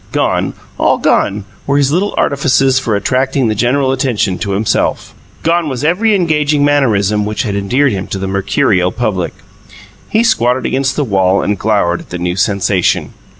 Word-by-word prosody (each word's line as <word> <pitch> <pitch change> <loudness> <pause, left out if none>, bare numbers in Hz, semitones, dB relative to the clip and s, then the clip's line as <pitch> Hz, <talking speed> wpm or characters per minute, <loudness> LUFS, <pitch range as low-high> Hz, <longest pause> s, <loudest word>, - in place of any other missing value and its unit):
Gone, - - 0 0.2
all - - +3
gone, 100 0 0 0.2
were 140 +1 +2
his 140 -1 +2
little 190 +6 0
artifices 135 -2 +2
for 115 -5 -1
attracting 130 +4 0
the - - +1
general 130 +5 +1
attention 120 -8 -1
to 100 -2 -2
himself; 105 +3 -1 0.3
gone 165 -1 +1
was 130 0 -4
every 205 +8 +2
engaging 150 -5 +1
mannerism 105 -8 +2
which 105 +1 -2
had 100 -4 -3
endeared 125 +8 +1
him 95 -2 -4
to - - -4
the 95 - -4
mercurial 95 -1 +1
public. 95 -8 -2 0.8
He 220 +1 +2
squatted 130 - +1
against 135 +1 0
the 150 - 0
wall 95 -4 +1
and 105 - 0
glowered 100 -5 +1
at - - -14
the 90 - -5
new 90 0 -2
sensation. 95 -1 0
120 Hz, 170 wpm, -14 LUFS, 100-140 Hz, 0.8 s, all